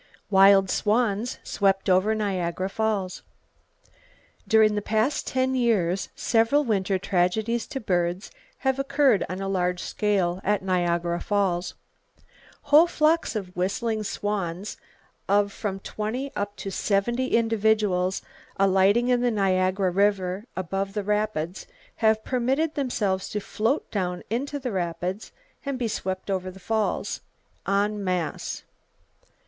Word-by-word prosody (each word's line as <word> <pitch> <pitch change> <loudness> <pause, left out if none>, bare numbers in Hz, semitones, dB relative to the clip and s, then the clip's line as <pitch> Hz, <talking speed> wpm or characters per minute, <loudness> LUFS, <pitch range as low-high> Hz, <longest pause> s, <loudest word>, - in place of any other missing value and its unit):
Wild 195 -1 +6
Swans 220 +1 +1
Swept 195 -1 +1
Over 190 +4 +3
Niagara 185 -3 -1
Falls. 205 -4 -1 1.3
—During 220 -1 +5
the 205 - -1
past 220 +7 0
ten 260 0 0
years, 200 -8 +1
several 230 +6 +2
winter 195 -5 0
tragedies 205 +6 0
to 270 - -4
birds 180 -3 -1 0.3
have 265 0 +2
occurred 275 -5 +3
on 185 +1 -4
a 195 - -3
large 180 -2 0
scale 190 -4 0
at 205 -1 +1
Niagara 175 -2 0
Falls. 190 -4 0 0.9
Whole 300 +4 +6
flocks 315 -3 +1
of 185 -4 -5
whistling 215 +5 -1
swans 200 -2 -3 0.5
of 200 0 +3
from 195 -3 -4
20 230 +8 -4
up 205 0 -3
to 195 - -6
70 235 +7 0
individuals 215 -5 +1 0.3
alighting 195 +5 +3
in 245 -1 +3
the 245 - +2
Niagara 190 -2 +1
River 195 0 +1
above 195 +2 -2
the 210 -1 -2
rapids 210 -4 -2 0.3
have 220 -1 +2
permitted 265 +5 0
themselves 210 -9 -1
to 210 - -2
float 225 +7 -1
down 180 -3 -2
into 275 +5 -2
the 260 -3 -4
rapids, 180 +2 -3 0.3
and 280 -2 -3
be 245 -2 -1
swept 190 -2 -3
over 185 -1 -2
the 190 +1 -12
Falls, 220 +2 -1 0.5
en 205 +1 +1
masse. 180 -5 -2
205 Hz, 125 wpm, -25 LUFS, 185-225 Hz, 1.3 s, Wild